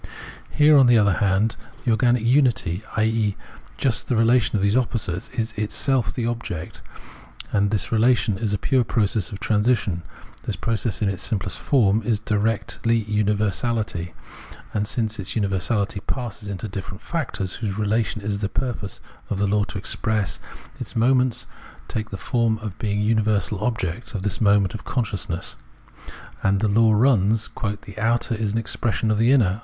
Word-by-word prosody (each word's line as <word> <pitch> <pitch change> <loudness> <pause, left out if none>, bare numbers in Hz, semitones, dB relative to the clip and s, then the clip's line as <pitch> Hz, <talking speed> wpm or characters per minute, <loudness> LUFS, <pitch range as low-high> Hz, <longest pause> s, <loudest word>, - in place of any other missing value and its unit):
Here, 150 0 +5
on 130 - +6
the 120 -1 +6
other 100 -3 +4
hand, 105 +4 +1 0.3
the 120 - +3
organic 120 +1 +3
unity, 120 - +2 0.2
i.e. 110 -2 +1 0.4
just 130 -4 0
the 125 - +1
relation 115 +1 +3
of 100 - +1
those 100 +2 +3
opposites, 115 -8 -1
is 115 0 -1
itself 120 +4 0
the 120 - -3
object; 115 -9 -4 0.7
and 100 -1 +2
this 105 -2 0
relation 115 -2 +3
is 110 -3 -1
a 105 - +1
pure 130 +4 +2
process 105 -2 0
of 100 - -6
transition. 105 -5 +1 0.4
This - - -3
process 110 -2 -1
in - - +2
its 100 -2 -2
simplest 95 -5 -2
form 110 -6 +3
is 110 -1 0
directly 110 +1 0
universahty; 105 -3 -1 0.6
and 105 0 0
since 110 -2 -1
universahty 100 +1 -1
passes 110 -5 -4
into 100 +2 -4
different 95 +1 -7
factors, 120 - -3
whose 105 -4 -3
relation 110 0 0
it - - -5
is 100 -1 -1
the 100 -1 -1
purpose 115 -4 -4 0.3
of 100 - -1
the 100 - +1
law 105 +1 +2
to - - -6
express, 105 +1 -1 0.4
its - - -6
moments 125 0 +2 0.4
take 110 -1 -4
the 100 - -5
form 115 0 +1
of 105 -2 -7
being 105 -2 -1
universal 105 -2 +1
objects 110 -2 -2
of 95 - -3
this 105 +1 -2
mode 100 -1 +4
of 110 - -6
consciousness, 100 -8 -2 0.8
and 95 0 +2
the 110 - +1
law 110 +2 +4
runs, 110 -2 +3 0.3
"the 100 +1 -10
outer 115 +2 +1
is 110 -2 -1
an - - 0
expression 115 -1 -1
of 105 - +1
the 115 +3 +4
inner." 105 -7 +3
110 Hz, 165 wpm, -23 LUFS, 100-115 Hz, 0.8 s, on